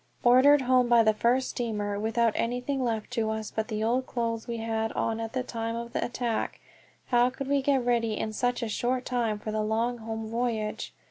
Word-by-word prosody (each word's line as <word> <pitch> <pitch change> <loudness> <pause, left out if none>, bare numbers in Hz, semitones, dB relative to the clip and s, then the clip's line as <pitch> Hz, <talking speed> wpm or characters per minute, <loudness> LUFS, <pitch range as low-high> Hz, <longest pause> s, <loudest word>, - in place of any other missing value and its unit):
Ordered 260 +4 +6
home 255 -1 +3
by 235 -1 +6
the 220 0 +4
first 245 +4 +1
steamer, 210 -4 -2
without 225 +1 +1
anything 250 +3 -1
left 225 -1 -2
to 225 -3 0
us 220 -1 -3
but 220 0 -2
the 215 -1 -2
old 250 +3 +1
clothes 230 -2 -2
we 235 -1 -3
had 225 0 -1
on 225 0 -1
at 225 0 -4
the 255 -1 -1
time 230 -2 -4
of 235 +1 -6
the - - 0
attack, 240 -2 -2 0.5
how 245 0 +4
could 265 +1 -6
we 280 0 +2
get 270 -2 +1
ready 235 -2 +1
in 215 - -3
such 245 +2 0
a - - -1
short 250 +4 -1
time 235 -4 0
for 215 +1 -5
the 215 0 -1
long 230 +3 0
home 225 0 -5
voyage? 225 -2 -2
235 Hz, 210 wpm, -28 LUFS, 220-245 Hz, 0.5 s, Ordered